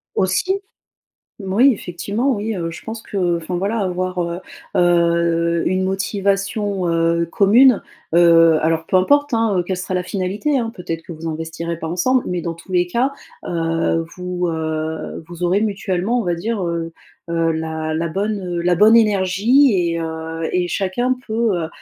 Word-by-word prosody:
Aussi! 285 - +1 0.8
Moui, 210 +8 +4
effectivement, 205 +7 -2
oui, 215 +1 -3
heu, 170 -2 -3
je - - -10
pense 220 0 -6
que, 180 -5 -1
enfin 170 +2 -5
voilà 200 +5 -1
avoir, 185 -2 -2
heu 170 +1 -3 0.3
heu, 170 -1 +2
une 185 +1 +1
motivation, 195 0 -1
heu, 165 0 +1
commune, 225 +5 +5 0.3
heu, 165 -2 +6
alors 160 0 0
peu 185 - +2
importe, 285 +9 +3
hein, 215 -5 +1
quelle 185 +1 -2
sera 185 +1 -4
la 180 - 0
finalité, 200 - -1
hein, 230 -1 -2
peut-être 165 -2 -5
que 170 - -9
vous 165 +1 -6
investirez 160 +1 -4
pas 165 - -5
ensemble. 240 +10 +1
Mais 180 -1 -2
dans 170 0 -4
tous 175 +3 -13
les 180 0 +2
cas, 250 +8 0 0.3
heu, 165 -1 0
vous, 180 -1 -2
heu, 160 0 -3
vous 175 0 -5
aurez 185 +4 +2
mutuellement 205 +1 -1
on 235 - -1
va 175 -1 0
dire, 210 +4 -3
heu 170 -1 -3 0.4
heu, 165 -1 +1
la 160 0 -3
la 165 +1 -1
bonne 195 -1 -2
la 175 +1 +2
bonne 215 +5 +6
énergie, 215 +5 +4 0.2
et 165 - -2
heu, 160 0 -4
et 180 -1 +1
chacun 200 +8 -1
peut 215 -7 0
180 Hz, 165 wpm, -19 LUFS, 170-205 Hz, 0.8 s, heu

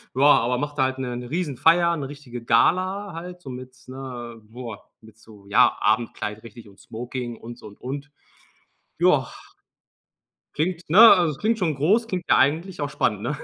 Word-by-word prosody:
Ja, 135 - +2
aber 125 -3 +4
macht 145 +2 -4
halt 130 -1 0
'ne 125 -2 -4
'ne 125 0 -8
Riesenfeier, 170 +2 +2
'ne 140 -2 -4
richtige 125 -5 -9
Gala 185 - +1
halt, 180 +2 -8
so 135 - -10
mit, 130 0 -9
ne, 125 -3 -8
boah, 115 0 -10
mit 110 -1 -18
so, 105 -2 -17
ja, 100 - +4
Abendkleid 110 -1 -1
richtig 115 -1 -13
und 100 - -20
Smoking 120 +1 -6
und 120 +1 -10
so - - -15
und 100 - -15
und. 140 +3 -6 0.9
Ja, - - +3 1.2
klingt, 165 +2 -3
ne? 180 +7 +5
Also, 185 -8 +7
es - - -12
klingt 225 +1 0
schon 165 -6 0
groß, 200 - +2
klingt 185 -5 -4
ja - - +5
eigentlich 160 +5 +1
auch 145 - -2
spannend, 105 -7 -1
ne? 150 - -3
135 Hz, 180 wpm, -23 LUFS, 120-170 Hz, 1.2 s, Also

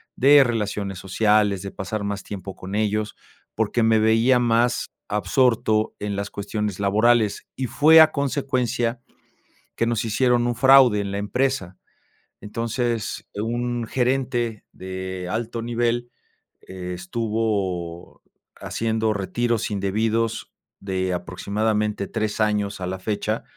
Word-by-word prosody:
de 140 +2 +7
relaciones 105 -5 -2
sociales, 105 +1 +2
de 100 - -5
pasar 100 +2 -5
más 100 0 -3
tiempo 95 -2 -7
con 95 +2 -8
ellos, 105 0 -1 0.4
porque 110 +2 0
me 110 0 +4
veía 115 +3 +4
más 120 0 +1 0.2
absorto 110 0 +1
en 105 -1 -3
las 100 0 -4
cuestiones 105 -1 -3
laborales. 110 +2 +2
Y 130 -2 -2
fue 160 +5 +7
a 155 - +6
consecuencia 130 -4 -1 0.8
que 115 - +1
nos 115 -2 0
hicieron 120 +2 +2
un 120 - 0
fraude 130 -3 +6
en 100 -1 -3
la 100 - -3
empresa. 105 -3 -1 0.6
Entonces, 115 +1 -3
un 120 +2 -2
gerente 125 -3 -1
de 95 -1 -6
alto 115 +2 -3
nivel 120 +1 -1 0.5
estuvo 95 -1 -3 0.3
haciendo 110 -1 -1
retiros 115 +3 -1
indebidos 110 +3 -1 0.3
de 95 -1 -2
aproximadamente 100 +4 -1
3 110 -2 -3
años 105 -2 0
a 90 - -2
la 95 - -3
fecha. 105 +2 -2
110 Hz, 120 wpm, -23 LUFS, 100-120 Hz, 0.8 s, de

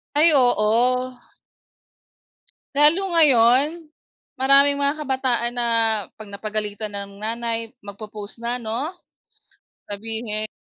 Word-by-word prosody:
Ay, 310 +3 +5
oo. 250 +1 +1 1.6
Lalo 300 +5 +5 0.2
ngayon, 290 +3 +4 0.5
maraming 275 +2 +4
mga 285 +2 -1
kabataan 260 -4 -1
na 240 -1 +1 0.5
'pag 215 - -10
napagalitan 210 0 -5
ng 200 0 -7
nanay, 230 +1 -3
magpo-post 205 +1 -10
na, 245 +1 -2
'no? 240 +9 -4 1.0
Sabihin 215 +1 -4
235 Hz, 90 wpm, -21 LUFS, 215-275 Hz, 1.6 s, Ay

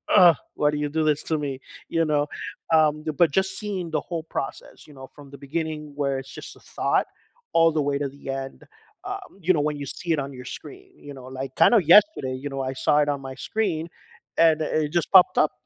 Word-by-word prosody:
"Ugh, 175 -4 +8 0.2
why 150 - +4
do 150 - -3
you 150 0 -2
do 160 +1 0
this 150 0 0
to 160 - +2
me?" 140 -3 -4 0.4
You 165 0 +3
know? 145 -1 +3 0.5
Um 155 -1 +4 0.3
but 170 - +6
just 190 0 -2
seeing 200 -5 -4
the 155 - 0
whole 170 -3 -4
process, 135 - -5
you 150 - -15
know, 130 0 -10
from 145 -2 -13
the - - -9
beginning 155 +1 -3 0.2
where 140 -1 0
it's 135 0 -11
just - - -10
a - - -18 0.2
thought - - +1 0.5
all 165 0 +6
the 155 -1 0
way 140 -1 +1
to - - -1
the 140 - -18 0.2
end, 135 - -11 0.5
um 390 -1 -6 0.2
you 185 - +5
know, 150 - +1
when 150 -1 -3
you - - -4
see 170 - -4
it - - -3
on 140 - -9
your 125 - -9
screen 385 0 -14 0.2
you 145 - -7
know 130 0 -11
like 135 -1 -4
kind - - +7
of - - +4
yesterday, 210 - +4
you 145 - -3
know, 135 - -6
when 130 - -2
I - - -6
saw 150 - +4
it 145 - -2
on 140 - -6
my 130 - -8
screen, 190 -8 -1 0.6
and 160 -1 +5
it 155 0 0
just 170 - 0
popped 185 - +7
up, 155 - 0
150 Hz, 240 wpm, -24 LUFS, 140-170 Hz, 0.6 s, Ugh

